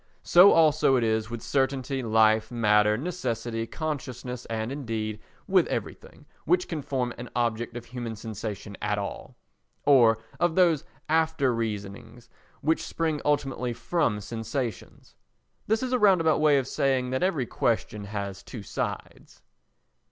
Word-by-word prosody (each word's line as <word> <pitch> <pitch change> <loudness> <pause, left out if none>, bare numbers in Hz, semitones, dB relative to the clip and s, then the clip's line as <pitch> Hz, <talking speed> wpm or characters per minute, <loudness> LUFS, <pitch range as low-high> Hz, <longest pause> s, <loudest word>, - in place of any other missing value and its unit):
So 180 +3 +7
also 155 -4 +4
it 125 - +2
is 110 -1 0
with 115 -1 -6
certainty, 135 -1 0
life, 110 -1 +3
matter, 105 -3 +3
necessity, 120 -7 -3
consciousness 130 -6 -5
and, 110 +1 -3
indeed, 110 -6 -4 0.3
with - - +4
everything - - -6 0.2
which 180 +3 +2
can 160 -3 -4
form 125 -3 -2
an 125 - -7
object 120 0 -1
of 120 - -8
human 120 -2 -6
sensation 105 -1 -6
at 105 0 0
all, 100 -1 -6 0.5
or 120 -6 +6 0.2
of 175 -2 +1
those 170 -6 +4 0.2
after 160 -4 +2
reasonings 110 +1 -5 0.3
which 160 +3 +1
spring 160 -3 -2
ultimately 135 -4 0
from 115 -1 0
sensations. 115 +3 -5 0.5
This 220 +3 +1
is 255 0 -2
a 250 - +2
round 195 -4 +5
about 160 -2 +2
way 150 -2 +5
of 135 -2 -1
saying 130 -2 0
that 130 - -1
every 170 -8 +1
question 110 -3 -1
has 100 -2 -5
two - - -9
sides. - - -6
125 Hz, 145 wpm, -27 LUFS, 110-150 Hz, 0.5 s, So